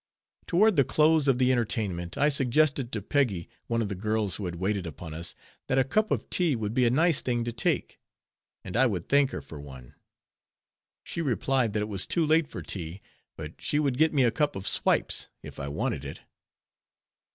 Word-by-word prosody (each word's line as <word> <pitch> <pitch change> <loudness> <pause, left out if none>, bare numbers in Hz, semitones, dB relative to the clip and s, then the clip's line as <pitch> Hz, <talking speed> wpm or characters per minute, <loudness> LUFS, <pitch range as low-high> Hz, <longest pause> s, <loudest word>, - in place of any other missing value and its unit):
Toward 205 +3 +3
the 140 - +6
close 155 +2 +3
of 135 -2 +4
the 130 0 +3
entertainment, 105 -8 -2
I 145 +1 +4
suggested 135 -1 +2
to 105 -3 -4
Peggy, 105 -10 0 0.2
one 115 -1 0
of - - -2
the 100 - -4
girls 105 0 -1
who 100 - -5
had 85 -1 -4
waited 95 +1 -2
upon 80 +1 -8
us, 80 +1 -5 0.3
that 130 - +1
a 135 - +5
cup 215 +11 +1
of - - -1
tea 170 -6 +2
would 110 -2 -3
be 125 0 +3
a - - +4
nice 160 +4 +3
thing 120 -2 -1
to 120 - -3
take; 115 - -1 0.6
and 95 - -7
I 130 +3 +5
would 90 -7 -3
thank 140 -1 +4
her - - -6
for 75 -3 -10
one. 65 -4 -12 1.1
She 170 - -4
replied 130 -4 0
that 105 -1 0
it - - -4
was 100 -3 -1
too 170 -2 +1
late 155 0 +3
for - - -8
tea; 85 0 -5 0.4
but - - -9
she - - 0
would 140 -4 0
get 160 0 +4
me 140 -4 +3
a 120 - +3
cup 150 0 0
of 95 0 -5
"swipes" - - +2 0.2
if - - -10
I 70 - -4
wanted 70 -1 -2
it. 70 - -8
120 Hz, 210 wpm, -27 LUFS, 95-145 Hz, 1.1 s, the